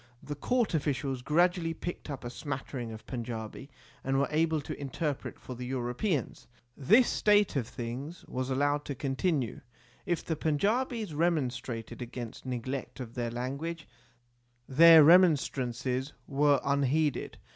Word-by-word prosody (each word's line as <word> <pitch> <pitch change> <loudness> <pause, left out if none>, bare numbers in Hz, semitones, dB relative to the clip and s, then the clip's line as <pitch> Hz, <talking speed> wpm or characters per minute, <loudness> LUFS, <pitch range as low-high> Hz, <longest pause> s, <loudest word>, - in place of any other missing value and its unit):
The 145 - -5
court 230 - 0
officials 140 -4 -1
gradually 165 +3 +2
picked 175 -2 -6
up 135 -2 -5
a 120 - -5
smattering 130 -3 -5
of 110 0 -10
Panjabi, 115 +1 -6 0.3
and 135 0 0
were 140 - +2
able 160 0 +2
to 145 - -6
interpret 140 +1 -3
for 130 - -8
the 125 0 -7
Europeans. 130 - -2 0.3
This 215 - +5
state 205 -3 +3
of 125 -5 0
things 130 +8 -6
was 130 +1 -3
allowed 145 +2 +1
to 140 - -4
continue. 135 0 -1 0.5
If 175 -2 -1
the 160 - -1
Panjabis 210 - 0
remonstrated 135 -8 -1
against 120 0 -7
neglect 130 +2 -4
of 120 -3 -7
their 120 -2 -2
language 140 +7 -4 0.8
their 160 +3 +8
remonstrances 135 -6 +3
were 145 0 +3
unheeded. 140 +2 +1
140 Hz, 135 wpm, -30 LUFS, 125-160 Hz, 0.8 s, their